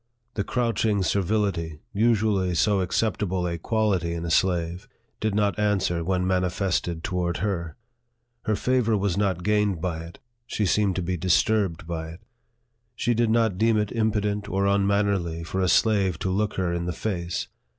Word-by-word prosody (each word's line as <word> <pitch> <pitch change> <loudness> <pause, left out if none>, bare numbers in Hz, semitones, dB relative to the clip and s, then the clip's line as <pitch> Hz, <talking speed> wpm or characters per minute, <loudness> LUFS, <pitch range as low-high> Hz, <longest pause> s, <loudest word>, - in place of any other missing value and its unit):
The 100 - -1
crouching 110 -4 0
servility, 95 -6 0
usually 105 -4 +2
so 100 +4 +2
acceptable 95 -1 0
a 85 -1 -2
quality 95 -5 0
in 85 0 -4
a 85 - -2
slave, 90 +3 +1 0.3
did 110 -2 -1
not 105 0 +1
answer 95 -5 +1
when 90 +1 0
manifested 90 -2 0
toward 90 -2 -1
her. 85 -5 -2 0.7
Her 110 - +1
favor 115 -1 +1
was 100 -3 0
not 95 -4 0
gained 105 -3 +1
by 80 -1 -2
it; 85 - -12 0.3
she 105 - -1
seemed 100 -1 +2
to 90 - -1
be 90 +1 -2
dis 90 0 +3
turbed 100 -7 0
by 80 -1 -4
it. 85 - -14 0.7
She 120 - +1
did 115 0 +1
not 110 -4 +2
deem 115 0 +3
it 105 -1 0
impudent 105 -2 0
or 100 +1 0
unman 100 +1 +2
nerly 85 -5 -2
for 95 +3 -2
a 95 - +2
slave 100 -6 +3
to 95 - -2
look 105 +2 0
her 90 -2 0
in 85 0 -2
the 90 - -2
face. 85 -5 -3
95 Hz, 170 wpm, -25 LUFS, 85-105 Hz, 0.7 s, dis